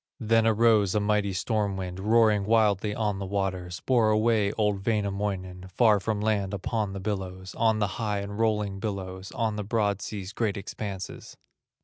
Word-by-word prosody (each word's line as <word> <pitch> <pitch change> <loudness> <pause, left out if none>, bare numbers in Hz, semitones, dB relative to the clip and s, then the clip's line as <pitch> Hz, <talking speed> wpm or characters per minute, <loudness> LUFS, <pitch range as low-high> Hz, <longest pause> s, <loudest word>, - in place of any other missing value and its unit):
Then 115 -1 +3
arose 110 -3 +4
a - - +4
mighty 105 -1 +1
storm 100 +1 -1
wind, 90 -1 -5
Roaring 110 0 +3
wildly 105 -2 +2
on 105 -3 -1
the 100 - -3
waters, 95 -3 -3
Bore 120 -4 +3
away 110 -1 +2
old 105 -3 0
Wainamoinen 100 -4 -2
Far 105 +1 +4
from 105 +2 -2
land 105 -2 0
upon 105 +1 -2
the 100 - -5
billows, 95 -2 -4
On 110 -1 +2
the 105 - +1 0.2
high 105 -2 -1
and 100 +1 -6
rolling 105 -3 0
billows, 95 -3 -5
On 110 -2 -1
the 105 - -2
broad 105 -2 0
sea's 100 -2 -6
great 110 -2 -1
expanses. 100 -1 -7
105 Hz, 165 wpm, -27 LUFS, 95-110 Hz, 0.2 s, arose